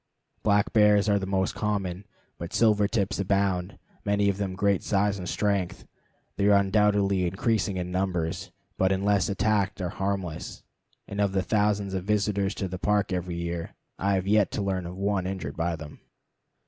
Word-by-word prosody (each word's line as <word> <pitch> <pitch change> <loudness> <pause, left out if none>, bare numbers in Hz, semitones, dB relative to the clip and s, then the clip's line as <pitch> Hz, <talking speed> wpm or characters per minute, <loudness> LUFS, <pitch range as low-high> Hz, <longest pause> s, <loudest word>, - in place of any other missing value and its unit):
Black 105 -1 +2
bears 105 -1 +5
are 100 -1 +3
the 95 - -4
most 95 -1 0
common, 100 -3 -2 0.3
but 85 0 -6
silver 105 -3 +4
tips 100 -3 -1
abound, 95 -1 0 0.3
many 100 0 +2
of 100 - -1
them 100 -2 -2
of - - -10
great 100 -1 +2
size 100 0 +1
and 90 -1 -5
strength. 100 -4 -1 0.5
They 100 - +2
are 100 -1 +6
undoubtedly 100 -2 +2
increasing 100 +1 0
in 90 0 -3
numbers, 90 -1 -2 0.3
but 95 0 +3
unless 100 0 +2
attacked 100 0 0
are 90 -2 -2
harmless; 95 -4 -4 0.4
and 100 +1 -3
of 100 -2 +1
the 95 -1 +1
thousands 105 -1 +1
of 95 -1 -2
visitors 100 -1 0
to 95 - -3
the 90 0 -6
Park 105 -1 +1
every 90 -1 -3
year 85 -1 -4 0.2
I 100 +1 +1
have 95 -1 -1
yet 105 0 +3
to 105 - -1
learn 95 -3 -2
of 90 +1 -8
one 100 -1 0
injured 90 -7 -4
by 85 0 -1
them. 75 -2 -10
100 Hz, 180 wpm, -27 LUFS, 95-105 Hz, 0.5 s, are